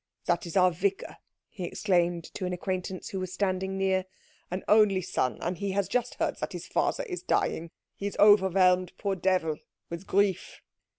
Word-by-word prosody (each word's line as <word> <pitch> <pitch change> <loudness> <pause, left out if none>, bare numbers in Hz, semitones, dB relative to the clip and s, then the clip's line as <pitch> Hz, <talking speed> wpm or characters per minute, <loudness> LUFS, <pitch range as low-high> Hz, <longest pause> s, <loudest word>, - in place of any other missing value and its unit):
That 175 0 0
is 170 - -2
our 185 -1 +5
vicar," 195 +3 -2 0.3
he 185 - -8
exclaimed 175 -2 +1
to 185 - -3
an 180 - -3
acquaintance 185 0 -4
who 195 - -4
was 185 -1 -4
standing 190 0 -1
near; 190 -1 +1 0.4
"an 180 +2 -4
only 210 -3 +4
son, 130 -5 -1
and 175 +2 -2
he 200 -1 -2
has 200 -1 0
just 245 -1 -1
heard - - -1
that - - -4
his - - -6
father - - 0
is 370 -7 -5
dying. 165 +1 0 0.3
He 200 - -4
is 200 - -6
overwhelmed, 185 -3 +5
poor 200 -1 -1
devil, 180 -4 +1 0.3
with 170 +3 -6
grief." 200 -2 0
185 Hz, 180 wpm, -28 LUFS, 180-200 Hz, 0.4 s, our